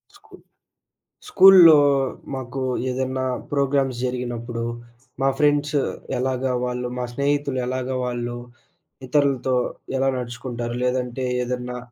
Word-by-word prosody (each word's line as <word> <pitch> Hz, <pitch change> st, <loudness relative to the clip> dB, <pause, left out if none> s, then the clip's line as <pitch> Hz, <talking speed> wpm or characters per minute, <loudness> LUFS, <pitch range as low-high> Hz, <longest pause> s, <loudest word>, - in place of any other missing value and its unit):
స్కూ -, -, -21 dB, 0.9 s
స్కూల్‌లో 185 Hz, -, +8 dB, 0.6 s
మాకు 130 Hz, 0 st, -5 dB, 0.3 s
ఏదన్నా 130 Hz, 0 st, -2 dB, 0.3 s
ప్రోగ్రామ్స్ 135 Hz, -3 st, 0 dB
జరిగినప్పుడు, 120 Hz, -2 st, -4 dB, 0.6 s
మా 135 Hz, -, +3 dB
ఫ్రెండ్స్ 145 Hz, 0 st, +2 dB, 0.4 s
ఎలాగా 130 Hz, 0 st, -1 dB
వాళ్ళు 125 Hz, 0 st, -3 dB
మా 125 Hz, -, -2 dB
స్నేహితులు 140 Hz, 0 st, 0 dB
ఎలాగా 130 Hz, 0 st, -3 dB
వాళ్ళు 120 Hz, -1 st, -3 dB, 0.7 s
ఇతరులతో 135 Hz, -2 st, +1 dB, 0.4 s
ఎలా 135 Hz, +1 st, +1 dB
నడుచుకుంటారు? 120 Hz, -1 st, -5 dB
లేదంటే 125 Hz, 0 st, -1 dB, 0.2 s
ఏదన్నా 125 Hz, 0 st, -4 dB
130 Hz, 95 wpm, -22 LUFS, 125-140 Hz, 0.9 s, స్కూల్‌లో